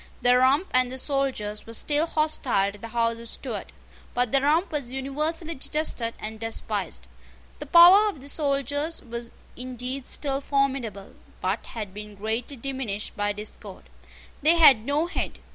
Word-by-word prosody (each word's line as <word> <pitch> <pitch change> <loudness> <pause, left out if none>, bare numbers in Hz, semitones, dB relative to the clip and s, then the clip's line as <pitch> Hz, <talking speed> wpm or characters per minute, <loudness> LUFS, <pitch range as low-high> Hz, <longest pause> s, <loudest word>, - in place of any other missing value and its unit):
The 245 0 +6
Rump 265 +7 +4
and 255 0 +3
the 260 - -6
soldiers 260 -7 -1
were 230 - -4
still 295 +6 +1
hostile 280 -11 +1
to 205 - -14
the 230 - -7
House 230 0 0
of 230 0 -9
Stuart. - - -6 0.4
But 245 -2 +1
the 275 - +4
Rump 320 +6 +2
was 285 -6 -3
universally 305 +5 -2
detested 265 -5 -1
and 220 0 -6
despised. 210 - -3 0.5
The - - -7
power 370 +5 +8
of 380 - -7
the 275 - -11
soldiers 285 +2 -1
was 235 -1 -6 0.2
indeed 255 +1 -5
still 275 -2 -2
formidable, 270 -8 -1 0.3
but 190 +4 -2
had 210 -5 -6
been 210 0 -9
greatly 220 +6 -3
diminished 245 -5 -4
by 205 0 0
discord. 210 +1 -9 0.5
They 315 +4 +5
had 270 -9 +6
no 290 +3 +1
head. 345 - -4
255 Hz, 160 wpm, -25 LUFS, 225-290 Hz, 0.5 s, power